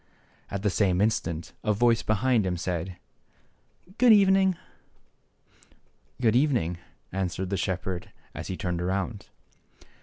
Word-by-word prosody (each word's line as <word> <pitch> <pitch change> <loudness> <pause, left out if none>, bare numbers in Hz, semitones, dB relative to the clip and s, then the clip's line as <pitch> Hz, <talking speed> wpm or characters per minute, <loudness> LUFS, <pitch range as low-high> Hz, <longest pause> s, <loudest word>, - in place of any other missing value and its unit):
And - - -5
at 100 - -4
the 105 - +2
same 90 -2 +2
instant 85 -6 -1
a 105 - +2
voice 115 +2 +3
behind 110 +2 +2
him 90 -2 -1
said 90 0 -3 0.5
" 190 +5 -27
Good 250 -2 +7
evening! 195 -2 +5 0.6
" - - -38
" 65 +5 -33
Good 115 -1 +4
evening! 120 - +1 0.2
" - - -42
answered 95 0 -3
the - - +1
shepherd, 95 -2 -3 0.2
as - - -6
he 95 - -4
turned 90 -2 -2
around. 95 +3 -3
95 Hz, 150 wpm, -27 LUFS, 90-120 Hz, 0.6 s, Good